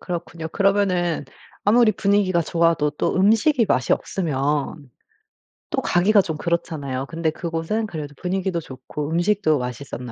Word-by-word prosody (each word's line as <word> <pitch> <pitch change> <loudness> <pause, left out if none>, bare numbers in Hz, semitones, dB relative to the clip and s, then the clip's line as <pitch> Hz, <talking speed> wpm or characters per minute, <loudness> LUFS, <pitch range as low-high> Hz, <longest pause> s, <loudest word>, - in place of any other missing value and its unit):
그렇군요. 170 -2 -5
그러면은 185 -5 +1 0.4
아무리 220 +1 +5
분위기가 195 -3 +2
좋아도 165 -2 +2
또 150 - -1
음식이 225 +6 +3
맛이 130 - +2
없으면, 145 -4 -2 0.8
또 - - -1
가기가 200 +4 +4
좀 160 -5 -4
그렇잖아요. 150 -6 -2
근데 165 -1 -1
그곳은 170 +7 -3
그래도 150 -5 -6
분위기도 185 -1 -1
좋고 145 +1 -7
음식도 175 -2 +2
맛있었나 125 0 -6
170 Hz, 345 characters per minute, -22 LUFS, 150-195 Hz, 0.8 s, 아무리